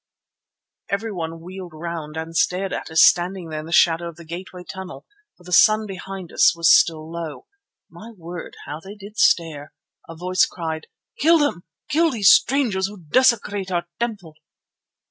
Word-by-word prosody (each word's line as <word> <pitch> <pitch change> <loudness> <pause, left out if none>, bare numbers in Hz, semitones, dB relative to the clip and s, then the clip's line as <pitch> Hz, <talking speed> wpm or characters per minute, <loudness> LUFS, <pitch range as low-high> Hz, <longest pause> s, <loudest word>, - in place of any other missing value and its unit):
Everyone 180 -6 -4
wheeled 180 0 -9
round 160 -1 -6
and 160 +1 -6
stared 185 +3 0
at - - -5
us 160 0 +5
standing 180 -1 +3
there 155 -1 -4
in 155 - -8
the - - -9
shadow 170 0 +3
of 170 - -12
the 170 +1 -13
gateway 180 +2 -8
tunnel, 190 0 -9 0.3
for 180 - -20
the 180 - -11
sun 215 +4 +5
behind 190 -2 -8
us - - +5
was 170 -1 +5
still 160 -2 +2
low. 170 - -6 0.4
My 225 - -12
word, 175 0 -9
how 145 +2 -6
they 195 +4 -11
did 205 +1 -11
stare! 155 -3 +1 0.4
A 165 - -8
voice 180 +2 +1
cried: 160 -2 -5 0.3
"Kill 330 +3 +5
them! 290 - -1 0.2
Kill 325 +2 +2
these 215 -8 +5
strangers 230 -9 +3
who 205 +1 -10
desecrate 205 - +2
our 175 -1 -1
temple." 210 -9 -4
180 Hz, 165 wpm, -22 LUFS, 165-200 Hz, 0.4 s, us